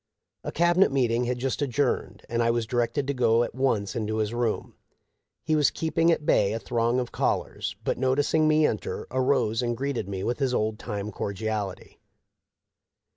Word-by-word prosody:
A - - -4
Cabinet 175 +2 +3
meeting 125 -3 +1
had 125 +1 -1
just 130 +3 -2
adjourned, 140 -1 -1
and 120 0 -1
I 115 - +2
was 115 -1 +1
directed 120 +4 0
to 140 - -1
go 120 -2 +3
at - - -5
once 120 -6 0
to 110 -3 -2
his 110 +1 -1
room. 120 -2 -1 0.7
He 155 - +2
was 150 -2 +4
keeping 165 +1 +1
at 155 - 0
bay 100 -6 +3
a 115 - -2
throng 120 +1 0
of 125 -1 -3
callers, - - -1
but, - - -1
noticing 145 +4 +2
me 155 0 +4
enter, 110 - -2
arose 130 -3 +1
and 120 -1 -1
greeted 135 -6 -2
me 95 -1 -4
with 120 - -1
his 130 -3 +1
old 110 +1 -1
time 105 -2 -4
cordiality. 100 0 -4
120 Hz, 180 wpm, -26 LUFS, 110-135 Hz, 0.7 s, was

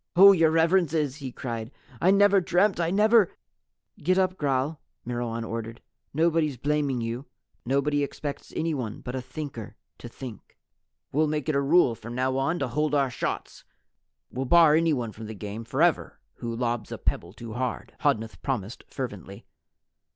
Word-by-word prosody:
"Oh, 195 +3 +10
Your 165 -4 +4
Reverences," 160 -3 +2
he 135 -4 -6
cried, 115 -3 -5 0.3
"I 180 - +4
never 200 0 +5
dreamt 180 +2 +2
I 165 -1 +1
never 210 +1 +4 0.3
" - - -33
"Get 185 +4 +3
up, 185 -1 +2
Gral," 140 0 -1 0.2
Myrwan 120 -1 -3
ordered. 115 0 -5 0.3
"Nobody's 160 -2 +1
blaming 140 -2 0
you. 115 +4 -4 0.4
Nobody 140 +2 +1
expects 140 0 -5
anyone 140 -10 -2
but 125 - -6
a 130 - -2
Thinker 130 -3 -7 0.2
to 120 - -8
Think." 120 -3 -10 0.5
"We'll 155 +3 +2
make 150 0 -2
it 155 - +1
a 140 - +3
rule 140 -2 +4
from 115 +1 -8
now 130 +1 0
on 140 +6 0
to - - -1
hold 150 +4 0
our 135 -3 +2
shots. - - -4 0.7
We'll 130 +2 -3
bar 165 +2 +6
anyone 150 -8 +2
from 110 +1 -9
the 110 - -7
game 105 +3 -6
forever 155 +8 +1 0.2
who 115 -1 -4
lobs 120 -1 -2
a - - -4
pebble 85 - -2
too 115 0 -8
hard," 125 +1 -3
Hodnuth 110 0 0
promised 120 -5 -3
fervently. 100 -7 -7
140 Hz, 165 wpm, -26 LUFS, 120-160 Hz, 0.7 s, Oh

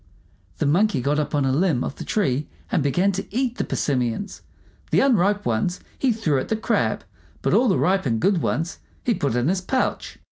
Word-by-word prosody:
The - - 0
Monkey 170 +2 +3
got 145 +4 0
up 150 0 -2
on 145 -2 +2
a 135 - +2
limb 150 -3 +2
of - - -5
the - - -6
tree 150 -9 0 0.2
and - - +2
began 175 +8 +2
to 195 0 -4
eat 245 +2 -1
the - - +2
persimmons. 125 - -2 0.5
The - - +3
unripe 205 -6 +3
ones 120 +11 0 0.2
he 265 - +1
threw 170 - 0
at - - -4
the 220 - 0
Crab, 220 - 0 0.4
but - - +1
all 255 - +4
the 190 - +3
ripe 190 -4 +1
and 115 -2 0
good 190 - +2
ones 165 +3 -2 0.2
he 240 - +2
put 140 - -1
in 125 +2 +1
his 185 +2 +1
pouch. 255 +8 -2
175 Hz, 210 wpm, -23 LUFS, 140-205 Hz, 0.5 s, all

